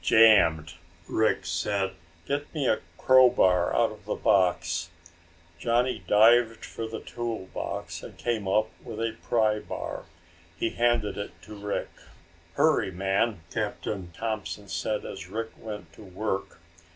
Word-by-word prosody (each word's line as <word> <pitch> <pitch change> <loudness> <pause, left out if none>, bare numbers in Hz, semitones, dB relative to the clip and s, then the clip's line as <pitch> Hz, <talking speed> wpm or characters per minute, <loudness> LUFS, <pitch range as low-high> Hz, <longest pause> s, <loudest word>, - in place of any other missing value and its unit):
"Jammed!" 85 -8 +5 0.3
Rick 110 -4 +1
said. 95 +4 -1 0.3
"Get 145 +1 -2
me 140 -4 0
a 110 - +3 0.2
crow 130 -1 +7
bar 90 -7 +3
out - - +3
of - - -13
the - - -2
box." 85 -2 +2 0.7
Johnny 120 +4 +1
dived 115 +2 +5
for 115 - -5
the 110 - -6
tool 115 -5 -5
box - - -4
and - - -11
came 115 -5 -2
up 110 +3 +2
with 110 -2 -7
a 115 -1 -1
pry 110 -2 +2
bar. - - -6 0.5
He 115 - 0
handed 115 -4 +1
it 100 - -7
to 105 - -10
Rick. 105 0 -3 0.6
"Hurry, 150 - +3
man," 95 +2 0
Captain 95 -4 -3
Thompson 105 0 -4
said 105 +1 -2
as 80 - -7
Rick 115 +3 -4
went 105 -7 -8
to - - -14
work. 95 +1 -3
105 Hz, 140 wpm, -27 LUFS, 95-115 Hz, 0.7 s, crow